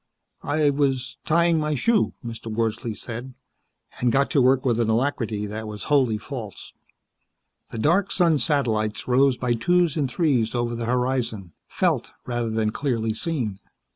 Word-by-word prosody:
"I 145 0 +2
was 135 -2 -1
tying 170 0 +3
my 150 0 0
shoe," 220 - +1
Mr. 115 -1 -7
Wordsley 115 0 -2
said, 125 +3 -7 0.6
and 120 -1 +2
got 140 +3 +2
to 140 - +3
work 130 +1 +3
with 120 -3 +2
an 115 -1 +1
alacrity 115 -3 0
that 110 +1 -5
was 105 -2 -7
wholly 130 -6 +3
false. 115 -2 -8 1.0
The - - -7
dark 175 - +2
sun 170 -5 +3
satellites 115 -7 0
rose 130 +1 +3
by 125 -2 0
twos 175 +7 +2
and 145 -5 0
threes 125 -6 +1
over 120 0 -1
the 115 0 -3
horizon, 125 -6 -1 0.2
felt - - 0
rather 120 -2 -2
than 110 -1 0
clearly 115 -4 -1
seen. 115 - -2
125 Hz, 155 wpm, -24 LUFS, 115-145 Hz, 1.0 s, tying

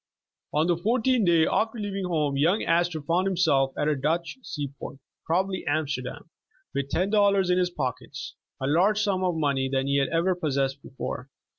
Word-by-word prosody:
On 155 +2 +2
the 175 -1 +2
fourteenth 230 +3 +2
day 165 -2 +5
after 225 +2 0
leaving 200 -2 -3
home, 155 -5 0
young 165 +9 +2
As 170 +1 +2
tor 160 -4 -6
found 175 +5 +1
himself 155 -8 +2
at 150 - 0
a 155 - +2
Dutch 165 - -1
sea 145 - -5
port - - -7 0.3
(probably 185 +3 0
Am 155 +2 +1
sterdam) 130 +1 -5 0.5
with 140 0 -2
ten 185 +6 0
dollars 200 -3 +3
in 180 - +3
his 180 -1 +2
pockets, 130 -3 -5 0.3
a 135 - -2
larger 185 +9 +3
sum 190 -3 0
of 180 -2 +1
money 140 -4 0
than 135 0 0
he 140 0 +1
had 135 -1 +1
ever 170 +3 +2
possessed 140 -5 -1
before. 130 0 -6
165 Hz, 190 wpm, -26 LUFS, 140-185 Hz, 0.5 s, day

